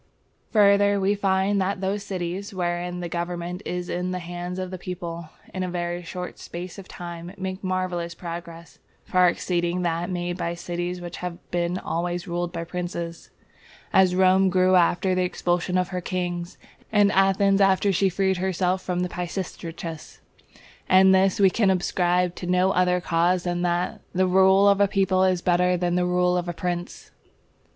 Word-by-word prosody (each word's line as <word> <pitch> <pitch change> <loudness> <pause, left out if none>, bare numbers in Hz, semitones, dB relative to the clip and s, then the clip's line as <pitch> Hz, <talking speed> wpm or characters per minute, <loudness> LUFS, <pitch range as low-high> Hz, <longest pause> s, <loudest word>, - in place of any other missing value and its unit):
Further, 200 -1 +4
we 195 +1 +2
find 195 0 +1
that 190 +1 -1
those 195 +2 -1
cities 190 +1 -4
wherein 175 0 -2
the 175 - -3
government 175 +1 -4
is 180 0 -3
in 180 +1 -2
the 185 - -2
hands 175 +1 -6
of 185 -1 -4
the 185 - -6
people, 170 -3 -6 0.2
in 185 - -3
a 185 - -2
very 175 0 -3
short 180 +1 -7
space 175 +3 -7
of 190 - -11
time, 175 0 -8
make 190 0 -5
marvellous 185 -2 -2
progress, 170 -1 -8 0.3
far 180 -1 +4
exceeding 175 0 -1
that 170 0 -1
made 175 0 -3
by 170 0 -2
cities 175 +1 -4
which 175 0 -7
have 180 -1 -5
been 175 +1 0
always 175 +1 -3
ruled 175 0 -2
by 170 -1 -4
princes; 170 -1 -5 0.6
as 185 -1 +5
Rome 190 +1 +4
grew 185 0 +3
after 180 +1 +3
the 185 - +1
expulsion 180 0 0
of 180 0 0
her 180 -1 -3
kings, 175 -1 -3 0.3
and 205 -2 +4
Athens 195 +1 +3
after 195 +1 +3
she 195 +2 +2
freed 190 0 0
herself 185 0 0
from 180 -1 -1
Pisistratus; 170 -2 -6 0.7
and 190 +1 +6
this 190 +1 +3
we 195 -2 +5
can 210 -1 +2
ascribe 180 -1 +1
to 180 - -5
no 180 +1 +3
other 180 -1 +2
cause 175 +1 +1
than 175 -1 -2
that 175 0 -1
the 185 +1 +3
rule 190 +2 +5
of 200 0 +4
a 200 - +5
people 190 -1 +2
is 185 -2 +1
better 180 0 +3
than 175 0 0
the 180 0 +1
rule 180 0 +2
of 175 0 -2
a - - -2
prince. 175 0 -5
180 Hz, 175 wpm, -24 LUFS, 175-190 Hz, 0.7 s, and